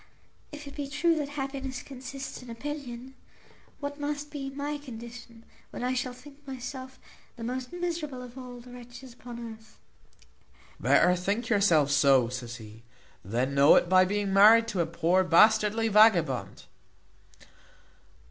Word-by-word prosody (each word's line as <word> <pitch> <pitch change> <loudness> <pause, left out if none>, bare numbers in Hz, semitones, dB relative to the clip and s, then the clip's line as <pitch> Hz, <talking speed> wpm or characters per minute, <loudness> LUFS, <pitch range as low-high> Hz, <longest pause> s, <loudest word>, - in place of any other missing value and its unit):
If 295 0 -9
it 280 - -10
be 285 -2 -4
true 300 +5 +1
that 290 -2 -2
happiness 270 -2 -5
consists 265 0 -8
in 250 - -12
opinion, 260 0 -7 0.7
what 285 0 -5
must 295 0 -4
be 275 -2 -5
my 290 +2 -4
condition, 235 -3 -11 0.3
when - - -7
I 250 +1 0
shall 255 0 -2
think 275 +3 -15
myself 260 0 -7 0.4
the 235 - -9
most 250 +3 -4
miserable 330 -7 -4
of 245 0 -12
all 250 -2 -9
the 245 +1 -14
wretches 245 +1 -12
upon 240 0 -10
earth?" 220 -2 -11 1.0
"Better 180 - +4
think 200 +6 -2
yourself 175 - +3
so," 135 -4 +4
said 125 -1 -6
he, 110 -2 -10 0.4
"than 120 +8 -1
know 140 +1 +6
it - - +3
by 185 0 +6
being 200 +1 -1
married 220 +3 +7
to 195 - -3
a 165 - -1
poor 170 +3 +2
bastardly 215 +5 +4
vagabond." 195 - +3
240 Hz, 150 wpm, -28 LUFS, 195-270 Hz, 1.0 s, married